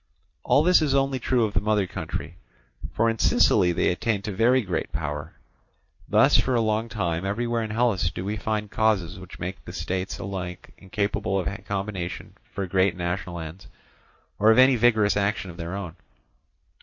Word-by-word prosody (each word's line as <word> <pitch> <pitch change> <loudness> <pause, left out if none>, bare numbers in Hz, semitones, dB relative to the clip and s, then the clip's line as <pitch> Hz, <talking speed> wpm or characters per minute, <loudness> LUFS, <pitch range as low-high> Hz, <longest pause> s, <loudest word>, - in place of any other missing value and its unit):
All 145 - +4
this 180 0 +5
is 145 -3 +1
only 135 -1 +1
true 125 -1 +1
of 105 - -4
the 95 - +2
mother 105 -1 +1
country, - - -6 0.5
for 115 - +1
in 115 -1 -1
Sicily 90 - +4
they 85 - +1
attained 105 +2 -1
to 105 - -3
very 120 +6 +3
great 90 -4 -3
power. 75 +1 -4 0.8
Thus - - +5
for 130 - 0
a - - +3
long 110 +1 0
time 85 -6 -2
everywhere 115 +4 -1
in 110 - -4
Hellas 110 -5 +1
do 90 - -6
we 105 +2 -2
find 105 0 -3
causes 100 -5 0
which 95 -1 -11
make 90 +2 -6
the - - -9
states 95 +1 -3
alike 90 -2 -6
incapable 100 0 -2
of 90 - -2 0.2
combination 95 -3 -4 0.2
for 100 - -3
great 95 0 +2
and - - -15
national 90 0 -3
ends, 80 +3 -9 0.7
or 105 - +5
of 110 - +5
any 130 +1 +7
vigorous 110 -4 +3
action 100 -2 -1
of 85 - -14
their 85 +1 -5
own. 90 -4 -6
100 Hz, 180 wpm, -25 LUFS, 90-110 Hz, 0.8 s, any